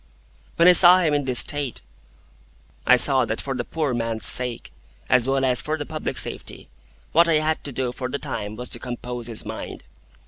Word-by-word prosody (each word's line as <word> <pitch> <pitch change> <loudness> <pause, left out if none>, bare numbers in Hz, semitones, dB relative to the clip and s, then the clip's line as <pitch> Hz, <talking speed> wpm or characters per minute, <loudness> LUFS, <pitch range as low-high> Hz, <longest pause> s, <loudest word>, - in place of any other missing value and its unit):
When 170 - +4
I - - +9
saw 180 0 +8
him 165 -5 0
in 145 -1 -1
this 125 -2 +5
state, 145 - -1 1.0
I 125 - +7
saw 130 +1 +4
that 110 0 -3
for 135 - -4
the 125 -2 -4
poor 150 -1 -3
man's 115 -2 -2
sake, 125 - +1 0.4
as 125 -1 +3
well 135 0 0
as 125 -2 +3
for 155 +1 -3
the 145 - -6
public 155 +1 -5
safety, - - -3 0.4
what 170 +2 +4
I 165 - +2
had 155 +1 -1
to 145 - -3
do 130 -1 -3
for 125 0 -6
the 140 - -4
time 110 -5 -6
was 125 +2 -8
to - - -2
compose 120 -1 -7
his 115 -2 -6
mind. - - -8
130 Hz, 205 wpm, -22 LUFS, 120-150 Hz, 1.0 s, I